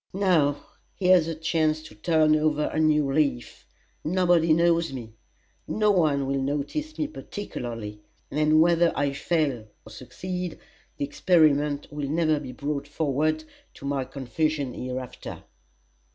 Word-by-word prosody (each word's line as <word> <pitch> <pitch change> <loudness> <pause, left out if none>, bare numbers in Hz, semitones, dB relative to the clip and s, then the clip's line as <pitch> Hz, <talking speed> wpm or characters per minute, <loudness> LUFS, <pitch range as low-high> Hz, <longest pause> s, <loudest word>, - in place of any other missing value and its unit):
Now, 175 -7 +2 0.3
here's 180 -3 +4
a 165 - -3
chance 155 -1 0
to 155 - -12
turn 155 +7 +3
over 150 -1 +1
a - - 0
new 150 -3 +3
leaf. 140 -5 -1 0.4
Nobody 175 -1 +3
knows 170 0 +3
me; 120 -4 -7 0.5
no 210 -1 +2
one 150 -7 +2
will 135 0 -1
notice 145 - -3
me 305 - 0
particularly; 120 - -6 0.3
and 155 +1 +3
whether 170 0 +4
I 140 -1 0
fail 140 -7 -1 0.2
or 110 - -12
succeed, 180 +8 -6 0.4
the 140 - -1
experiment 150 -2 +2
will 145 -2 -3
never 155 -1 +2
be 135 -3 -7
brought 140 +2 -4
forward 155 +1 0 0.3
to - - -11
my 140 -1 -1
confusion 140 +1 -2
hereafter." 130 0 -6
155 Hz, 135 wpm, -26 LUFS, 140-165 Hz, 0.5 s, here's